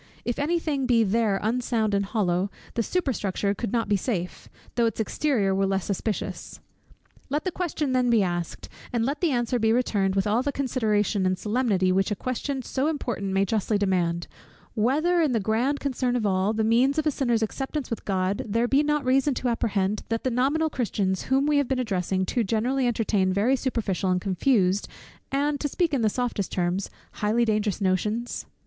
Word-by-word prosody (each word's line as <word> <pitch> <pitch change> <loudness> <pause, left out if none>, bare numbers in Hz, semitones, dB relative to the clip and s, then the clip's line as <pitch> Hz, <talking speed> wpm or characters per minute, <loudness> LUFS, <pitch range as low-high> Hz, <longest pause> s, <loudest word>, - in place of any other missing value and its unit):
If 240 - -2
any 320 +5 +1
thing 285 -5 -1
be 235 -2 +4
there 210 -1 +1
unsound 225 -1 0
and 200 0 +2
hollow, 195 -3 0 0.2
the 235 - 0
superstructure 210 - -1
could 205 +1 -4
not 230 -2 0
be 205 - +2
safe, 180 -3 -3 0.2
though 235 -1 +2
its 225 - -4
exterior 220 -3 +1
were 195 0 +1
less 195 -1 -1
suspicious. 205 +2 -3 0.7
Let 295 +3 -1
the 370 - -1
question 315 -6 -2
then 250 -1 +2
be 230 -4 +4
asked, 175 -2 -3 0.2
and 230 -2 0
let 280 +4 -2
the 345 - +3
answer 245 -2 0
be 220 0 +3
returned 205 -5 +1
with 195 - +1
all 215 +3 +2
the 285 +2 -1
consideration 220 -7 0
and 185 0 0
solemnity 210 -4 +1
which 195 +3 +2
a 210 - -1
question 255 +4 -3
so 265 +4 -1
important 240 -10 -2
may 195 +1 +2
justly 215 +1 0
demand, 175 -4 0 0.5
whether, 300 +10 +2
in 300 -6 +2
the 230 - +2
grand 230 +8 0
concern 255 -3 -1
of 235 -3 0
all, 190 +1 +2
the 220 0 0
means 245 +6 +3
of 310 - +1
a 305 - +3
sinner's 240 -5 +1
acceptance 270 +4 -4
with 230 - -3
God, 195 +4 -1
there 230 +3 +1
be 275 +3 +3
not 295 -2 0
reason 265 +2 +2
to 250 - -1
apprehend, 210 -3 0
that 230 0 -1
the 255 - 0
nominal 285 +6 +1
Christians 200 -7 -1
whom 270 +1 +2
we 295 -1 +3
have 285 -2 +2
been 265 - 0
addressing, 190 -5 -1
too 240 +5 0
generally 245 +5 0
entertain 210 -5 +1
very 210 +8 +2
superficial, 225 -8 -1
and 180 0 +2
confused, 195 0 +1 0.4
and 285 +1 0
(to 290 - -1
speak 330 +2 0
in 270 - +1
the 220 - +3
softest 235 -4 -2
terms) 180 +2 -1 0.3
highly 220 +3 +2
dangerous 215 -2 0
notions? 210 +5 -1
230 Hz, 195 wpm, -25 LUFS, 200-265 Hz, 0.7 s, be